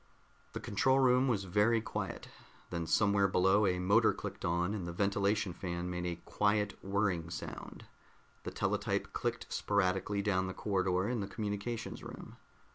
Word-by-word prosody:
The - - -4
control 130 +6 +2
room 130 0 +4
was 110 -6 +1
very 105 +5 +3
quiet. 110 - -4 0.4
Then 85 -2 -2
somewhere 100 0 +3
below 95 +2 +4
a 90 -1 +1
motor 100 +5 +4
clicked - - -7
on, 85 +3 +1
and 95 -5 -4
the - - -3
ventilation 100 +1 +1
fan 90 -1 -4
made 90 0 -3
a 85 - -2
quiet 105 0 +1
whirring 95 -4 0
sound. 85 - -7 0.6
The - - -5
teletype - - -1
clicked - - -3
sporadically 100 0 +1
down 95 -2 +1
the 95 - -5
corridor 95 -1 0
in 120 -1 -1
the 100 - -3
communications 105 +3 -4
room. - - -9
100 Hz, 155 wpm, -33 LUFS, 90-105 Hz, 0.6 s, room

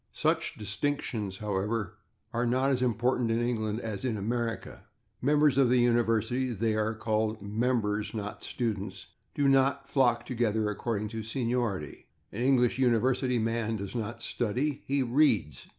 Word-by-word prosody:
Such 160 +1 0
distinctions, 105 -2 -3
however, 105 0 -2 0.4
are 120 +1 +1
not 130 +3 +2
as 130 -2 +1
important 120 0 +1
in 115 +1 +1
England 115 -2 -1
as 110 -2 -5
in 120 -4 -1
America; 115 +3 -3 0.4
members 145 0 +4
of 130 -3 +5
the 125 - +4
university 120 +1 +2
(they 110 +1 0
are 110 +1 0
called 110 0 -1
[Pg105] 100 +1 -7 0.3
/members/, 105 0 -2
not 105 -1 -5
/students/) 110 -5 -3 0.3
do 145 - +2
not 135 +1 +3
flock 120 -4 +2
together 110 -3 0
according 105 0 -2
to 110 0 -5
seniority. 115 - -2 0.2
An 110 - -5
English 125 -1 +3
university 125 +1 +2
man 115 0 0
does 100 -2 -5
not 115 0 -4
/study/; 130 +6 -1
he 140 0 +1
/reads 120 - +2
115 Hz, 150 wpm, -29 LUFS, 110-130 Hz, 0.4 s, of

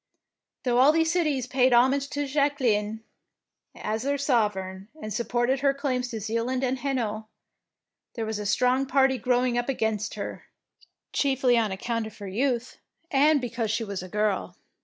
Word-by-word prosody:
Though 245 -1 +2
all 270 +4 +7
these 325 0 +2
cities 305 -8 +1
paid 255 0 +3
homage 270 +3 +3
to 290 0 -2
Jacqueline 250 -7 0 0.7
as 215 +1 -3
their 280 +3 0
sovereign, 205 -8 0
and 215 -6 -5
supported 240 +3 0
her 275 0 +2
claims 255 -3 -1
to 230 -2 -5
Zealand 230 +5 -1
and 260 0 0
Hainault, 225 -6 -2 0.9
there 225 -3 -2
was 220 -1 -3
a 205 - -3
strong 255 +5 +2
party 265 -1 +3
growing 245 +1 +1
up 240 - -3
against 220 -5 -1
her, 205 - -6 0.7
chiefly 265 -3 +2
on 225 -3 +1
account 225 +3 -2
of 220 - -12
her 200 - -7
youth, 245 +4 -1 0.3
and 290 +2 +4
because 235 -3 -3
she 225 +2 0
was 200 -4 -4
a 185 - -9
girl. 210 -3 -1
245 Hz, 160 wpm, -26 LUFS, 220-270 Hz, 0.9 s, all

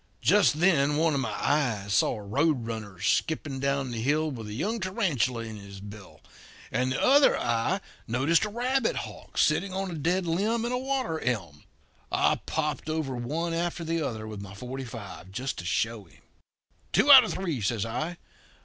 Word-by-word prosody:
"Just 200 -7 +4
then 150 -6 +4
one 160 0 +2
of 140 - +1
my 135 - -1
eyes 115 -9 0
saw 105 - +2
a 105 - -10
roadrunner 115 - -1
skipping 140 - 0
down 140 -1 0
the 115 -1 -3
hill 150 +5 +1
with 115 -5 -7
a 105 - -6
young 210 - -1
tarantula 160 - 0
in 110 -1 -7
his 100 -1 -10
bill, 105 +1 -11 0.5
and 130 +1 0
the - - -1
other 280 +2 +5
eye 120 +12 0 0.3
noticed 135 - +2
a 210 - -1
rabbit 245 +2 0
hawk - - -7
sitting 195 -1 +2
on 190 -1 -2
a - - -5
dead 175 +4 0
limb 210 +8 0
in 240 - -2
a 250 - 0
water 260 -11 -1
elm. 90 -12 -3 0.5
I - - +2
popped 155 0 -2
over 155 -4 -2
one 155 +8 -2
after 170 0 -2
the 165 0 -1
other 115 -7 -3
with 105 -2 -7
my 100 -1 -9
forty 130 +5 -6
five, 100 -5 -9
just 130 +7 -4
to 85 - -7
show 110 +3 -1
him. 85 - -23 0.7
'Two 290 - +5
out 265 -2 +12
of 220 - -3
three,' 170 -10 -2
says 105 +1 0
I. 155 +10 -3
140 Hz, 185 wpm, -27 LUFS, 115-175 Hz, 0.7 s, out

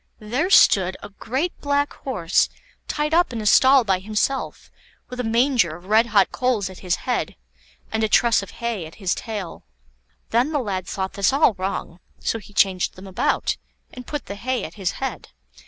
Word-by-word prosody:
There 250 - -2
stood 190 - +5
a - - -7
great 260 - -3
black 285 0 0
horse 190 -11 0 0.4
tied 300 +1 -1
up 345 -2 +3
in 235 - -4
a 215 - -5
stall 260 +5 +6
by 190 -4 +1
himself, 215 +7 -2 0.4
with 250 - -8
a - - 0
manger 230 - +2
of 175 +2 -14
red 220 +4 +4
hot 210 -3 +3
coals 230 -7 0
at 185 - -12
his 180 -2 0
head 250 -1 -1 0.6
and 220 0 0
a 220 - +1
truss 235 0 +4
of 195 - -9
hay 230 -8 -4
at 160 - -14
his 190 -4 -1
tail. 205 -7 -6 0.7
Then 245 +7 +2
the - - +2
lad 195 -7 -3
thought 190 -1 -3
this 200 +4 +2
all 275 -3 +4
wrong, 185 -2 -4 0.2
so 225 - -2
he 205 - -15
changed 190 -2 +1
them 185 - -11
about, 190 -1 0 0.4
and 250 -1 -10
put 295 -1 -4
the - - -6
hay 250 +5 -2
at - - -7
his 190 -4 -2
head. - - -5
220 Hz, 190 wpm, -22 LUFS, 190-255 Hz, 0.7 s, stall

